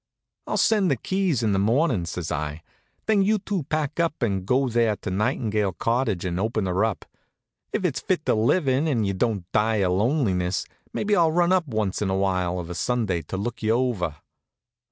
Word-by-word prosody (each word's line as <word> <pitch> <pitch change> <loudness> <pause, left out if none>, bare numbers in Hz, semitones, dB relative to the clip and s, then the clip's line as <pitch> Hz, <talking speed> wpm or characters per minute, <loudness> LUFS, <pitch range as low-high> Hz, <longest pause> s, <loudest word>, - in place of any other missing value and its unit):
"I'll - - -1
send 210 -5 +3
the 135 - +3
keys 180 - 0
in 110 - +2
the 95 - +2
mornin'," 115 - +2
says 85 -1 -4
I. 75 0 -3 0.4
"Then 215 -2 +3
you 215 +3 +3
two 195 -5 -3
pack 155 0 -1
up 165 -5 0
and 95 -4 -1
go 130 +4 +3
out 125 - -3
there 115 -2 +2
to 90 - -6
Nightingale 105 -1 0
Cottage 110 -1 0
and 90 0 -2
open 110 0 0
her 95 +2 +1
up. 110 -3 -1 0.7
If - - -1
it's - - 0
fit - - -1
to - - +3
live 120 +9 +2
in, 135 +4 +2
and 120 -8 +1
you 100 - 0
don't 100 -2 -1
die 110 +1 +2
of 95 -4 +1
lonesomeness, 95 - +1 0.3
maybe 210 0 0
I'll 165 -3 +4
run 175 +2 +2
up 180 -4 +2
once 110 -6 -1
in 100 - 0
a 95 - 0
while 90 -2 0
of 90 -1 -5
a - - -3
Sunday 105 -3 0
to 80 +5 -6
look 115 +5 -4
you 110 0 +2
over." 115 - 0
110 Hz, 210 wpm, -24 LUFS, 95-140 Hz, 0.7 s, I'll